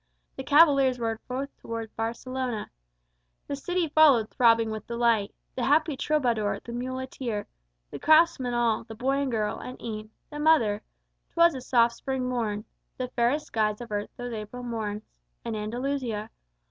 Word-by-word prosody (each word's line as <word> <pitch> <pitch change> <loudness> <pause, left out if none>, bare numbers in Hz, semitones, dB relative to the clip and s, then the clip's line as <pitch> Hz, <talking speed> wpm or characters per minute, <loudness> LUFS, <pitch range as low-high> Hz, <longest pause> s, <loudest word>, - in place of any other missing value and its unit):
The - - -5
cavaliers 280 -4 +5
rode 225 -1 -2
forth 270 +2 -4
toward 230 -1 -6
Barcelona. 235 +1 -3 0.7
The 285 - -3
city 350 +4 -1
followed, 285 -8 +5
throbbing 230 -2 +4
with 215 0 -6
delight. 235 -3 +1 0.2
The 250 - -2
happy 305 +1 +3
troubadour, 245 -8 0
the 235 - -8
muleteer, 255 -3 -4 0.5
The - - -6
craftsmen 310 -6 +4
all, 235 -2 +1
the 225 -1 -10
boy 270 +5 0
and 275 -2 -1
girl, 215 -2 -1
and 255 - -8
e'en 215 -2 -6 0.2
The 295 - -6
mother 240 -10 +3 0.5
'twas 340 0 +5
a 260 - -6
soft 235 -2 +3
spring 265 -2 -2
morn; 220 -4 -2 0.3
The 255 -1 -3
fairest 250 +6 +1
skies 215 -1 0
of 240 -2 -9
earth 205 0 -2
those 245 -1 -5
April 220 +3 -6
morns 215 -3 -3 0.4
In 230 -1 -2
Andalusia. 230 0 -3
240 Hz, 155 wpm, -27 LUFS, 220-270 Hz, 0.7 s, cavaliers